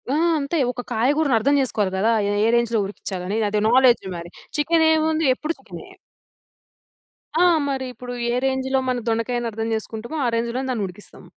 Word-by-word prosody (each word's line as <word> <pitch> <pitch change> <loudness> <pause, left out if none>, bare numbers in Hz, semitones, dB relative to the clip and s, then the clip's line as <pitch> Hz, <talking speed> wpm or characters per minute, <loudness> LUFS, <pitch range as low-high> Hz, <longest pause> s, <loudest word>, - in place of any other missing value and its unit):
ఆ! - - +2 0.2
అంతే. 285 +4 -2
ఒక 245 - -6
కాయగూరని 270 +4 +2
అర్థం 280 +6 +2
చేసుకోవాలి 210 -7 -1
గదా! 215 +4 +2 0.2
ఏ - - 0
ఏ - - +3
రేంజ్‌లో 235 -2 +1
ఉడికించాలి? 195 0 -5
అది 210 0 0
నాలెడ్జ్. 250 -3 +5
మరి 170 0 -8 0.3
చికెన్ 320 +2 +3
ఏముంది? 315 0 +1
ఎప్పుడు 315 +4 -3
చికెనే. - - -11 1.5
ఆ! 355 - +5 0.3
మరి 265 -1 -2
ఇప్పుడు 245 0 -8 0.2
ఏ - - 0
రేంజ్‌లో 265 0 0
మనం 250 -1 0
దొండకాయని 230 +1 -1
అర్థం 225 +1 -3
చేసుకుంటామో, 225 +6 -5
ఆ - - +2
రేంజ్‌లోనే 235 +3 -2
దాన్ని 215 -5 -1
ఉడికిస్తాం. 185 +3 -14
245 Hz, 165 wpm, -22 LUFS, 220-270 Hz, 1.5 s, నాలెడ్జ్